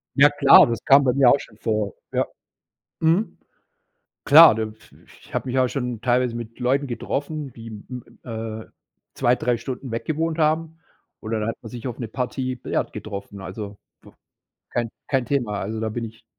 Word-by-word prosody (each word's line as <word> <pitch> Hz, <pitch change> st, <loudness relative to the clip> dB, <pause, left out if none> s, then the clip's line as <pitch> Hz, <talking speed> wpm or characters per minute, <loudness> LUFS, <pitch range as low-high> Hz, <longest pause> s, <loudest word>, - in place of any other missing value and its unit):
Ja 145 Hz, +1 st, +7 dB
klar, 145 Hz, -1 st, +7 dB
das 115 Hz, -1 st, -3 dB
kam 140 Hz, -1 st, +7 dB
bei 125 Hz, -2 st, +2 dB
mir 135 Hz, -2 st, +5 dB
auch 140 Hz, -, +5 dB
schon 105 Hz, -, -13 dB
vor, 110 Hz, -3 st, -1 dB, 0.2 s
ja, -, -, +1 dB, 0.7 s
mhm. 165 Hz, +7 st, +2 dB, 0.9 s
Klar, 155 Hz, -4 st, +9 dB
da 110 Hz, -, -1 dB
i 110 Hz, 0 st, -6 dB, 0.5 s
ich -, -, -18 dB
habe -, -, -2 dB
mich 130 Hz, +1 st, +1 dB
auch 130 Hz, -, +3 dB
schon 125 Hz, -4 st, -4 dB
teilweise 125 Hz, -1 st, +1 dB
mit 115 Hz, 0 st, -8 dB
Leuten 135 Hz, +3 st, +1 dB
getroffen, 140 Hz, +3 st, -4 dB
die 115 Hz, 0 st, -11 dB
m 115 Hz, +3 st, -8 dB, 0.2 s
äh, 110 Hz, -2 st, -6 dB, 0.5 s
2, 120 Hz, +1 st, +2 dB
3 120 Hz, -1 st, 0 dB
Stunden 130 Hz, 0 st, -6 dB
weggewohnt 160 Hz, +7 st, -2 dB
haben, 160 Hz, +1 st, 0 dB, 0.4 s
und 110 Hz, -, -7 dB
dann 110 Hz, -1 st, -1 dB
hat 115 Hz, -, -2 dB
man 115 Hz, -, -9 dB
sich 120 Hz, +2 st, -6 dB
auf 120 Hz, -, -6 dB
'ne 120 Hz, -, -4 dB
Partie 130 Hz, +2 st, -3 dB
Billard 125 Hz, -, -3 dB
getroffen. 100 Hz, -1 st, -7 dB
Also, 100 Hz, +2 st, -7 dB, 0.2 s
b -, -, -16 dB, 0.6 s
kein 120 Hz, -2 st, -2 dB, 0.2 s
kein 135 Hz, -3 st, +1 dB
Thema, 120 Hz, -6 st, -1 dB
also, 110 Hz, +3 st, -4 dB
da 110 Hz, -, -1 dB
bin 115 Hz, +2 st, -4 dB
ich 115 Hz, 0 st, -11 dB
120 Hz, 185 wpm, -23 LUFS, 110-140 Hz, 0.9 s, Klar